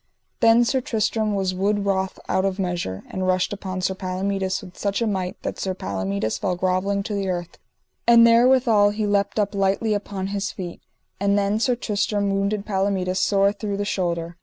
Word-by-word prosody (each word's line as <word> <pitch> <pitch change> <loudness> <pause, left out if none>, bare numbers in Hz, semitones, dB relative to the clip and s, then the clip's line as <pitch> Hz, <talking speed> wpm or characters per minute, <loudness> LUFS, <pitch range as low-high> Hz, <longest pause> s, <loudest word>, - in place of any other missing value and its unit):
Then 230 +1 +5
Sir 260 +2 +1
Tristram 220 -2 0
was 190 -2 0
wood 200 +2 0
wroth 190 -1 -1
out 190 - +1
of 195 -1 -1
measure, 175 - -3
and 185 0 -3
rushed 185 +1 +1
upon 185 -2 -5
Sir 190 - 0
Palomides 190 +1 -2
with 185 -2 -12
such 200 -1 -1
a 230 - +1
might 190 -4 -2
that - - -4
Sir 190 -1 -2
Palomides 100 - -2
fell 185 -3 -1
grovelling 185 +2 0
to 210 - -4
the 200 -2 -1
earth; 175 -1 -4 0.5
and 235 -1 +8
therewithal 235 -3 +5
he 210 +1 -2
leapt 200 0 0
up 210 -1 +1
lightly 200 +2 +1
upon 200 -2 -3
his 200 0 -2
feet, 175 -3 -7 0.4
and 200 +1 +2
then 200 +1 +1
Sir 245 +2 +2
Tristram 205 -3 -1
wounded 200 +1 -1
Palomides 190 -2 0
sore 200 0 +3
through 205 -1 -4
the 205 - -2
shoulder. 170 -3 -2
200 Hz, 185 wpm, -23 LUFS, 185-205 Hz, 0.5 s, and